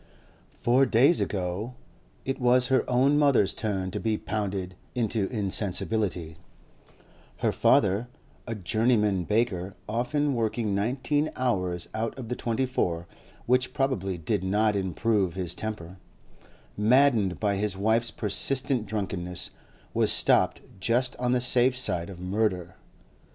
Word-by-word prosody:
Four 130 +3 +3
days 135 +9 +4
ago 100 +5 -3 0.5
it 135 - -2
was 125 0 +3
her 130 - +1
own 135 +4 +3
mother's 130 -9 +3
turn 95 -4 -3
to - - -3
be 110 -1 0
pounded 95 -3 -3 0.2
into 110 -4 0
insensibility; 95 -4 -1 1.1
her - - +3
father 100 +5 +2 0.4
(a 115 - -3
journeyman 105 -2 +1
baker, 100 -4 -1
often 140 +6 0
working 110 -2 -1
nineteen 130 +9 0
hours 90 -9 -1
out 115 +3 -3
of 120 -4 -7
the 125 - -2
twenty 120 +3 -1
four, 85 -9 -2 0.4
which 125 +1 +1
probably 100 -9 -1
did 95 +4 -2
not 105 +3 +1
improve 95 0 0
his 90 -2 -2
temper), 95 -3 -6 0.8
maddened 110 -3 +3
by 100 -2 0
his 100 -2 -2
wife's 110 +4 +2
persistent 125 +2 +1
drunkenness, 95 -4 -4 0.4
was - - +4
stopped - - +3 0.2
just 120 +6 0
on 125 0 0
the 125 - +2
safe 125 +1 +3
side 90 -8 -1
of 95 -3 -10
murder. 90 -2 -1
110 Hz, 130 wpm, -27 LUFS, 95-125 Hz, 1.1 s, days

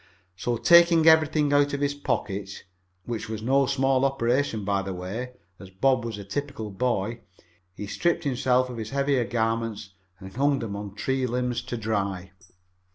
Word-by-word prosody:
So, 120 +7 -2
taking 170 +2 +6
everything 155 -2 +4
out 145 0 +3
of 140 - -2
his 145 0 +1
pockets, 100 -8 -3 0.4
which 115 -2 -5
was 110 -1 -5
no 135 +2 +3
small 135 0 +1
operation 125 -4 0
by 100 -1 +1
the 95 -1 -5
way, 110 +8 -5 0.3
as 95 - -11
Bob 120 +6 +1
was 115 -3 -4
a 100 - -7
typical 115 0 -5
boy, 115 +1 -1 0.6
he 105 - -6
stripped 170 - 0
himself 130 -2 +1
of 120 - -7
his 110 -1 -5
heavier 140 -2 +1
garments 115 -3 -2 0.3
and 95 -1 -10
hung 140 +2 +2
them 115 -6 -5
on 100 -1 -7
tree 130 +4 -1
limbs 125 0 -1
to 120 0 -5
dry. 100 -4 -2
120 Hz, 165 wpm, -26 LUFS, 105-140 Hz, 0.6 s, taking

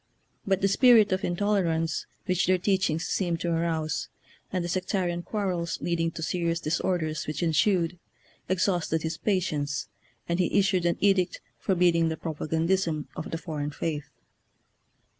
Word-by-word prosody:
But 195 0 +2
the' 195 - +4
spirit 220 0 +6
of 185 0 0
intolerance 175 -4 0 0.2
which 180 -1 +1
their 185 0 +4
teachings 180 -4 +1
seemed 175 -3 -1
to 170 - 0
arouse, 160 -3 -1 0.4
and 180 -2 -1
the - - -2
sectarian 180 -1 -1
quarrels 180 -4 -2
leading 165 -1 0
to 160 - -5
serious 170 0 0
dis 165 0 -1
orders 160 -4 -1
which 150 +2 -2
ensued, 170 +1 +2 0.5
exhausted 175 -3 +1
his 160 0 -2
pa 205 -3 +2
tience, 145 -8 -2 0.4
and 170 +1 0
he 180 - +2
issued 190 -3 +3
an 170 - +1
edict 195 -3 +2 0.2
forbidding 175 -3 +3
the 160 - -3
propagandism 160 +1 -1
of 155 - -5
the 165 - -3
foreign 150 -4 -4
faith. 150 0 -4
170 Hz, 150 wpm, -27 LUFS, 160-185 Hz, 0.5 s, spirit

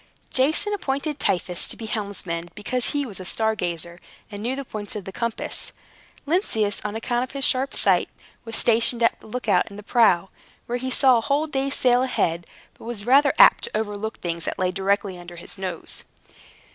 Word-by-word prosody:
Jason 310 +10 +2
appointed 290 -5 -2
Tiphys 180 -1 0
to - - -3
be 225 - -7
helmsman 195 -6 -3
because 235 +3 -1
he 285 -1 -1
was 205 -7 -7
a - - -6
star 220 +4 0
gazer, 170 -2 -4 0.3
and 205 0 -7
knew 245 +4 -1
the 275 0 -5
points 210 -3 -5
of 205 -3 -5
the 190 - -6
compass. 235 +2 -3 0.5
Lynceus, 225 - 0
on 210 0 -4
account 240 +2 0
of 255 - -8
his 275 0 +3
sharp 265 -1 +2
sight, - - +3 0.3
was 225 -1 -6
stationed 235 +1 +4
as 230 - +5
a - - -14
look 250 +3 -5
out - - +3
in 200 - -11
the 210 - -9
prow, 195 -5 +3 0.4
where 245 +1 -3
he 260 +1 -3
saw 255 -1 +4
a - - -3
whole 285 +6 +1
day's 275 -2 -1
sail 250 -1 +3
ahead, 170 -10 0 0.3
but - - -15
was 230 -3 -3
rather 280 +4 +5
apt - - +7
to 470 - -3
overlook 215 0 -4
things 170 -2 -3
that - - -2
lay 185 -1 0
directly 195 0 -1
under 175 0 -10
his 175 - -11
nose. 185 -3 -4
220 Hz, 200 wpm, -23 LUFS, 195-260 Hz, 0.5 s, apt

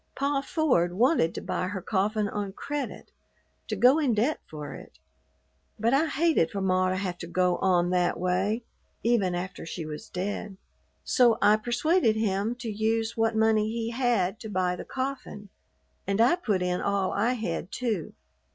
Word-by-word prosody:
"Pa 275 0 0
Ford 265 - +1
wanted 230 - +3
to - - -4
buy 180 - -2
her 190 0 -4
coffin 205 +3 0
on 200 -1 -4
credit, 290 +6 -5 0.6
to 215 - -2
go 250 +9 +5
in 265 -7 +2
debt 245 +9 +1
for 150 -2 -7
it, 65 - -12 0.8
but 230 +4 +2
I 300 +4 +3
hated 310 - +2
for 200 - -4
ma 185 -1 +2
to 185 - 0
have 185 -2 -3
to 170 - -6
go 180 0 +1
on 180 -2 +2
that 180 -1 +1
way 190 +6 0 0.4
even 210 -7 +2
after 185 +1 -5
she 165 0 -6
was 155 +8 -7
dead; 195 +1 -4 0.5
so 240 -3 +4
I 210 -4 +5
persuaded 240 +4 +2
him 215 +1 0
to 240 -2 -5
use 225 +2 0
what 225 0 +1
money 220 -1 +3
he 230 0 -3
had 230 -5 0
to 220 - -7
buy 185 -2 0
the - - -8
coffin, 260 -6 -5 0.6
and 195 +1 0
I 240 +8 +5
put 210 - -1
in 180 0 -1
all 200 -2 0
I 230 +5 +1
had, 195 -5 -4
too. 220 -10 -2
215 Hz, 175 wpm, -27 LUFS, 185-240 Hz, 0.8 s, go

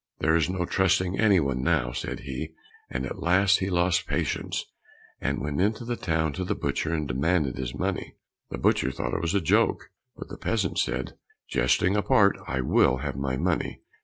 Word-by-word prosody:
"There 80 +1 +2
is 85 +1 +2
no 90 -1 -1
trusting 95 0 +1
any 105 -4 +5
one 70 -4 -1
now," 65 -5 +1
said - - -4
he; 75 +4 -6 0.3
and 65 +1 -3
at 65 - -6
last 95 +3 +4
he 95 - -1
lost 90 -1 +1
patience, - - -2 0.5
and - - -1
went 70 +3 -2
into 110 +4 0
the 120 0 -2
town 80 -6 -1
to 90 - -3
the 90 - -1
butcher 80 - -2
and 75 -3 -1
demanded 70 +1 +1
his 60 -1 -4
money. - - -3 0.3
The - - -5
butcher 65 - +2
thought - - -4
it - - -1
was 85 +3 -1
a 100 - +3
joke, 80 - +1 0.3
but - - -8
the - - -8
peasant - - -1
said, 65 0 -1 0.3
"Jesting 85 +10 +2
apart, 105 -1 +4
I 65 0 -1
will 65 0 +3
have - - -3
my 65 -1 -2
money! 85 +3 -1
80 Hz, 190 wpm, -26 LUFS, 65-95 Hz, 0.5 s, any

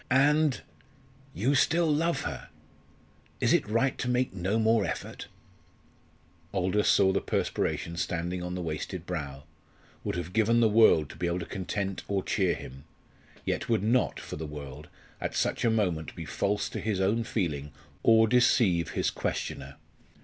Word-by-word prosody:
And 145 +2 +3 0.7
you 125 +8 +1
still 160 +5 +3
love 165 +2 +1
her. 70 -5 -6 0.9
Is - - +3
it - - +2
right 120 +4 +1
to 125 - -2
make 125 -2 +1
no 95 +3 -1
more 110 -1 +3
effort?" 85 - -5 1.3
Aldous 95 +3 +1
saw 95 -1 +5
the 100 - +1
perspiration 85 0 -2
standing 85 +2 -2
on 90 0 -4
the 90 - -3
wasted 85 +2 -4
brow 70 -6 -5 0.6
would - - -2
have 90 0 -5
given 115 +2 +3
the 115 - +5
world 105 -8 +5
to - - -13
be 90 - -1
able 85 +1 0
to - - -4
content 95 0 -3
or 100 -2 -1
cheer 95 -4 +1
him 65 +3 -10 0.6
yet - - -2
would 110 -4 +2
not, 120 +4 +1
for - - -7
the 80 0 -5
world, 75 0 -8 0.3
at - - -3
such - - 0
a 115 - +4
moment 90 -8 -1
be 85 - -6
false 100 +5 -1
to - - -5
his 105 -3 -1
own 105 +5 +1
feeling 75 - -2 0.3
or 110 0 +5
deceive 110 -8 +3
his - - 0
questioner. 70 +1 -4
95 Hz, 165 wpm, -28 LUFS, 85-115 Hz, 1.3 s, saw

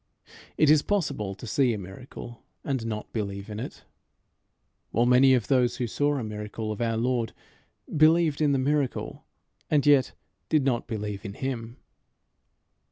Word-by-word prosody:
It 155 -1 +5
is 155 -1 +6
possible 140 - -1
to 95 - -10
see 120 +1 +2
a - - -4
miracle, 105 +5 -10 0.2
and 130 -5 -2
not 105 -1 -5
believe 100 -1 -4
in 105 - -5
it; 120 - -7 1.1
while 120 +2 +2
many 130 +2 +6
of 120 - 0
those 125 -3 +2
who 125 - -1
saw 145 +5 0
a 130 - -2
miracle 105 0 -5
of 105 - -5
our 115 -1 0
Lord 120 -1 0 0.6
believed 155 0 +4
in 150 -2 +3
the 140 - +2
miracle, 140 0 -1 0.4
and 150 -2 +2
yet 140 -3 +4 0.4
did 155 -4 +3
not 125 -4 0
believe 105 -2 -4
in 100 -2 -6
him. 120 -2 -4
120 Hz, 160 wpm, -27 LUFS, 110-140 Hz, 1.1 s, is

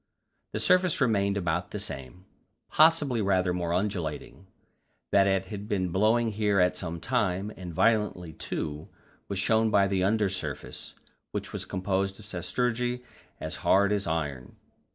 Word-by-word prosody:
The - - -1
surface 185 -2 +3
remained 100 -6 +2
about 90 -1 -1
the - - -5
same 90 -3 -6 0.5
possibly 150 -7 +4
rather 95 -2 +2
more 85 -1 -2
undulating. 90 -1 -3 0.6
That 100 0 +5
it 95 -1 +1
had 105 0 -6
been 95 -4 0
blowing 110 +6 +2
here 105 -2 +1
at 90 0 +3
some 85 -2 -4
time, 100 -1 0
and 90 -2 -7
violently 105 -3 +1
too, 75 0 -4 0.4
was 100 - -3
shown 110 +3 +3
by 100 -2 +4
the 95 -1 0
under 105 +1 +2
surface, 85 -7 -5 0.3
which - - -5
was - - -4
composed 95 0 -1
of 105 - -12
sastrugi 120 +6 -1 0.4
as 80 +3 -5
hard 100 +3 +3
as 100 -1 0
iron. 75 -6 -3
100 Hz, 150 wpm, -28 LUFS, 90-110 Hz, 0.6 s, That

